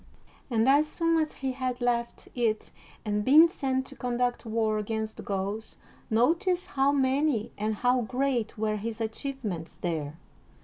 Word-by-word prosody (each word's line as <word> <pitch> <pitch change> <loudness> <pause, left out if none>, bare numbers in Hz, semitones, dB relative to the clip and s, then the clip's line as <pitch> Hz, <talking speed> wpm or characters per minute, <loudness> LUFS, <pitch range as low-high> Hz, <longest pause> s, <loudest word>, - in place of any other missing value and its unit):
And 230 -1 +2
as 290 +3 +5
soon 330 +1 +1
as 310 - -2
he 265 - +1
had 255 -1 -3
left 235 -1 -1
it 225 -3 -1 0.3
and 210 0 0
been 300 +8 +8
sent 265 -6 -1
to 275 - -11
conduct 245 -1 -1
war 220 -1 +1
against 220 +1 -3
the - - -6
Gauls, 200 +2 -4 0.3
notice 345 - +2
how 270 +1 +2
many 270 -3 +1
and 215 +1 -1
how 250 +3 +2
great 245 -1 -1
were 215 0 0
his 220 +2 -5
achievements 220 -7 -4
there. 160 -3 -3
240 Hz, 150 wpm, -28 LUFS, 215-270 Hz, 0.3 s, been